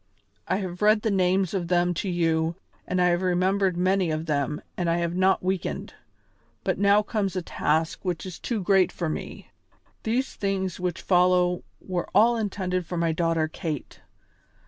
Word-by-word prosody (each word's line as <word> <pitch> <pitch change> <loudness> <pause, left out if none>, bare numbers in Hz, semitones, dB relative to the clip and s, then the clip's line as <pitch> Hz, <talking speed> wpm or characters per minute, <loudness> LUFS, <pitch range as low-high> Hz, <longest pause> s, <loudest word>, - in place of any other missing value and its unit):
I - - +1
have 185 -2 -4
read 210 0 +4
the 220 - +1
names 185 -1 +2
of 180 -3 -1
them 175 0 +2
to 195 - -3
you 165 -1 +1 0.3
and 180 - 0
I 180 0 +4
have 175 +1 +1
remembered 185 +1 +1
many 185 0 +2
of 155 +1 -2
them 150 -1 -1 0.2
and 175 -2 -1
I 165 - +2
have 170 0 -1
not 190 0 +3
weakened, 185 -1 -2 0.7
but - - -1
now 200 +1 +4
comes 205 -3 -2
a 185 - -2
task 160 0 0
which 180 -3 -3
is 185 -3 -7
too 225 -5 -2
great 190 -1 +4
for 170 -3 -3
me. - - -6 0.5
These 245 +4 -1
things 190 -2 -2
which 180 -1 -3
follow 180 -1 +3 0.2
were 180 -2 -4
all 230 +4 +6
intended 190 -4 -2
for 175 - -4
my 165 -1 +1
daughter 165 -1 +1
Kate. 155 -3 -5
180 Hz, 175 wpm, -26 LUFS, 170-195 Hz, 0.7 s, all